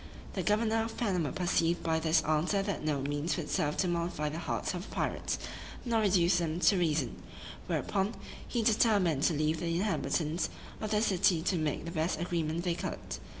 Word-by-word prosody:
The -, -, -1 dB
governor 220 Hz, +1 st, +2 dB
of 225 Hz, -, -6 dB
Panama 180 Hz, -10 st, 0 dB
perceived 175 Hz, -1 st, +1 dB
by 160 Hz, -1 st, +1 dB
this 160 Hz, 0 st, +3 dB
answer 160 Hz, +6 st, +1 dB
that 200 Hz, -5 st, -3 dB
no 150 Hz, -3 st, 0 dB
means 145 Hz, +5 st, -1 dB
would 160 Hz, -4 st, -4 dB
serve 150 Hz, 0 st, 0 dB
to 185 Hz, -, +2 dB
mollify 170 Hz, -3 st, -1 dB
the 155 Hz, +2 st, -5 dB
hearts 170 Hz, -, -2 dB
of 180 Hz, +3 st, -5 dB
the -, -, -10 dB
pirates, -, -, -1 dB, 0.5 s
nor 230 Hz, -2 st, +2 dB
reduce 180 Hz, -3 st, +4 dB
them 165 Hz, 0 st, -1 dB
to 200 Hz, -, +5 dB
reason: 155 Hz, -7 st, 0 dB, 0.5 s
whereupon, 200 Hz, +3 st, 0 dB, 0.3 s
he 235 Hz, -2 st, -1 dB
determined 205 Hz, -, +3 dB
to 165 Hz, -, +3 dB
leave 155 Hz, +2 st, +1 dB
the 170 Hz, -, -2 dB
inhabitants 170 Hz, -4 st, 0 dB, 0.3 s
of 215 Hz, -, -2 dB
the 210 Hz, 0 st, +2 dB
city 180 Hz, -5 st, +3 dB
to 185 Hz, -, +1 dB
make 155 Hz, -2 st, -1 dB
the 170 Hz, -, -4 dB
best 165 Hz, 0 st, -1 dB
agreement 170 Hz, -1 st, -1 dB
they 175 Hz, -2 st, +1 dB
could. 170 Hz, -, -5 dB
170 Hz, 190 wpm, -31 LUFS, 155-195 Hz, 0.5 s, to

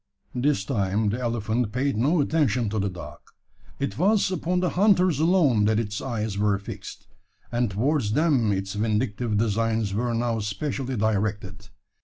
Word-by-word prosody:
This 125 Hz, -5 st, 0 dB
time 105 Hz, -2 st, 0 dB
the 115 Hz, +5 st, -2 dB
elephant 115 Hz, -1 st, -1 dB
paid 135 Hz, +2 st, 0 dB
no 145 Hz, +9 st, +2 dB
attention 135 Hz, -7 st, +1 dB
to 110 Hz, -, -1 dB
the 100 Hz, 0 st, 0 dB
dog. 90 Hz, -2 st, -9 dB, 0.6 s
It 140 Hz, +1 st, -3 dB
was 200 Hz, +1 st, +3 dB
upon 180 Hz, 0 st, -1 dB
the 180 Hz, -1 st, 0 dB
hunters 185 Hz, -5 st, +3 dB
alone 155 Hz, -, +3 dB
that 110 Hz, 0 st, +2 dB
its 105 Hz, -2 st, -3 dB
eyes 110 Hz, -5 st, -3 dB
were 105 Hz, -1 st, +2 dB
fixed; 100 Hz, -, -9 dB, 0.5 s
and 120 Hz, -1 st, 0 dB
towards 115 Hz, +2 st, 0 dB
them 135 Hz, -7 st, +2 dB
its 95 Hz, 0 st, -2 dB
vindictive 110 Hz, +1 st, -1 dB
designs 110 Hz, -1 st, 0 dB
were 120 Hz, +3 st, -1 dB
now 115 Hz, -1 st, 0 dB
specially 130 Hz, +5 st, -3 dB
directed. 105 Hz, -2 st, -2 dB
115 Hz, 155 wpm, -25 LUFS, 105-140 Hz, 0.6 s, was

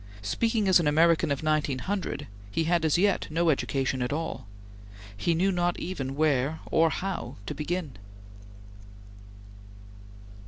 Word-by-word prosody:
Speaking 220 Hz, -, 0 dB
as 185 Hz, -1 st, +6 dB
an 165 Hz, -, +1 dB
American 160 Hz, +2 st, +4 dB
of 140 Hz, +1 st, -1 dB
1900, 155 Hz, +5 st, -1 dB, 0.2 s
he 130 Hz, +11 st, 0 dB
had 170 Hz, +1 st, +1 dB
as 155 Hz, -, +3 dB
yet 200 Hz, +2 st, +2 dB
no 165 Hz, +1 st, +2 dB
education 135 Hz, -2 st, -1 dB
at 125 Hz, -, -1 dB
all. 160 Hz, -8 st, -4 dB, 0.7 s
He 165 Hz, +11 st, 0 dB
knew 190 Hz, +4 st, +2 dB
not 175 Hz, -1 st, 0 dB
even 135 Hz, -7 st, -4 dB
where 150 Hz, 0 st, +1 dB
or 165 Hz, 0 st, +4 dB
how 190 Hz, +3 st, -4 dB
to -, -, -4 dB
begin. 155 Hz, -3 st, -3 dB
160 Hz, 130 wpm, -27 LUFS, 140-175 Hz, 0.7 s, as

